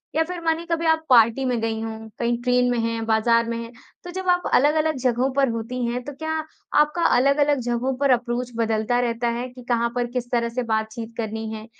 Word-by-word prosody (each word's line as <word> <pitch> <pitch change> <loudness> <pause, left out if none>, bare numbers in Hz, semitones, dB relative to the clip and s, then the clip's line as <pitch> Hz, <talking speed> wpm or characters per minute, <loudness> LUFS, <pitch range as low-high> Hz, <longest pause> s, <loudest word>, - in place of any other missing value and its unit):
या 320 - +3
फिर 355 +2 -6
मानिए 330 0 0
कभी 335 -1 -1
आप 320 0 +3
पार्टी 235 +1 +5
में 245 -2 0
गईं 225 0 -2
हों, 225 0 -6
कहीं 235 0 +1
ट्रेन 250 0 +3
में 245 - 0
हैं, 230 0 -2
बाज़ार 230 +1 +2
में 230 - -2
हैं, 230 0 -7 0.3
तो 355 - -7
जब 375 +1 -5
आप 355 0 +3
अलग-अलग 310 +3 +3
जगहों 250 +1 +1
पर 275 -1 +2
होती 230 +2 -3
हैं, 245 +1 -2
तो 290 - -7
क्या 315 +3 -5 0.5
आपका 300 +3 +2 0.2
अलग-अलग 280 +2 +3
जगहों 245 +2 -1
पर 280 0 +1
अप्रोच 240 0 0
बदलता 225 +1 0
रहता 235 -1 -1
है 245 - -3
कि 250 0 -13
कहाँ 235 -1 +2
पर 245 -1 0
किस 245 -1 -3
तरह 235 -1 +1
से 250 +2 -3
बातचीत 220 0 -3
करनी 220 -1 -3
है? 215 0 -7
245 Hz, 220 wpm, -23 LUFS, 230-280 Hz, 0.5 s, पार्टी